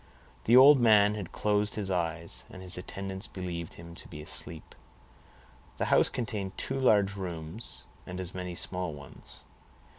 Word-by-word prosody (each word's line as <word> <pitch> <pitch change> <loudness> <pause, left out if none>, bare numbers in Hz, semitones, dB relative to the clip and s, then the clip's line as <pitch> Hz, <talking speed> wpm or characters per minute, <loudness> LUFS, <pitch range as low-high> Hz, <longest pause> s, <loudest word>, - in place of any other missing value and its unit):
The 120 +3 +6
old 135 +2 +9
man 105 -3 +5
had 100 -5 -6
closed 105 0 0
his 100 -3 -1
eyes, 85 -2 -2
and 95 - -10
his 90 -1 +1
attendants 95 +2 -5
believed 85 -3 -6
him 85 0 -11
to - - -11
be 75 - -9
asleep. 80 +1 -4 1.0
The - - 0
house - - +5
contained 105 -5 -4
two 135 0 -2
large 100 -6 +3
rooms 85 +1 -4 0.2
and 90 +1 -6
as 90 0 -5
many 90 -1 -5
small 90 -1 -1
ones. 70 -2 -12
95 Hz, 155 wpm, -29 LUFS, 85-105 Hz, 1.0 s, old